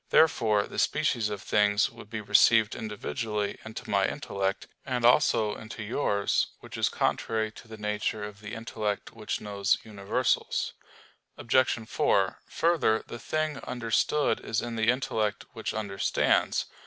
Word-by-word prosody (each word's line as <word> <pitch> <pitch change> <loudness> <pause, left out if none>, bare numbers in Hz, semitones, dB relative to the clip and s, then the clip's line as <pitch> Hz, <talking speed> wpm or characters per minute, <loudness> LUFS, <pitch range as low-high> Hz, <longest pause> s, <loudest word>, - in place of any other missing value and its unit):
Therefore 110 -9 +4
the - - -5
species 125 -8 +1
of 105 -2 -5
things 105 0 +3
would 115 -2 -13
be 110 -1 -4
received 105 +1 +5
individually 105 -1 -3
into 110 0 -8
my - - +2
intellect, 95 0 -2 0.2
and 125 -3 -1
also 115 -4 +4
into 110 0 -8
yours: 105 -3 +1
which - - -10
is - - +2
contrary 110 -1 0
to 115 - -14
the 110 0 -9
nature 105 0 -2
of 105 0 -8
the 105 +1 -7
intellect 110 -2 -3
which 110 -2 -4
knows 100 -2 +1
universals. 100 -3 -1 0.6
Obj. 120 -2 +2
4: - - +1
Further, 165 -10 +2
the 120 - -8
thing 155 +1 -1
understood 120 +5 0
is 110 - -2
in 120 -1 -4
the 110 0 +2
intellect 110 -5 0
which 115 -2 -3
understands. 100 -3 +1
110 Hz, 140 wpm, -28 LUFS, 105-120 Hz, 0.6 s, received